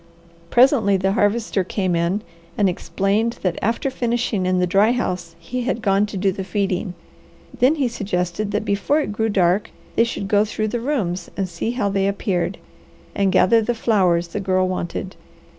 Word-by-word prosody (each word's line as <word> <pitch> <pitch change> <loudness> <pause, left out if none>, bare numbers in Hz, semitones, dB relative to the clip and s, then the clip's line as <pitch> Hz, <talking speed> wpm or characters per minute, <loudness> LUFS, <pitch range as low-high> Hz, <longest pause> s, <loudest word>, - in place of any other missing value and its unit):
Presently 240 -6 +4
the 190 +1 +1
Harvester 205 -1 +1
came 185 -1 -1
in 170 +5 0 0.3
and 205 - +3
explained 195 +6 0
that 185 - 0
after 230 +5 0
finishing 235 -6 -1
in 185 0 +2
the 180 - +2
dry 200 +6 +3
house 180 -8 -3
he 225 +10 -5
had 235 -1 -1
gone 200 +1 +2
to 205 - -6
do 195 +1 +2
the 190 +1 -5
feeding. 190 -1 -2 0.6
Then 265 +5 +4
he 280 -5 +1
suggested 200 -3 -2
that 210 +1 -2
before 205 +10 +1
it 290 - -3
grew 220 +2 -1
dark 190 0 +2 0.3
they 230 - +5
should 230 -4 -3
go 205 0 +3
through 215 0 -2
the 240 - -2
rooms 205 - -2
and 195 -1 -1
see 175 +5 -4
how 225 -5 0
they 195 0 +1
appeared, 200 -3 -1 0.6
and 200 -1 +1
gather 225 +5 +4
the 240 +2 -1
flowers 180 -7 +2
the 205 - -4
Girl 185 -1 +1
wanted. 185 0 -4
200 Hz, 180 wpm, -21 LUFS, 185-225 Hz, 0.6 s, they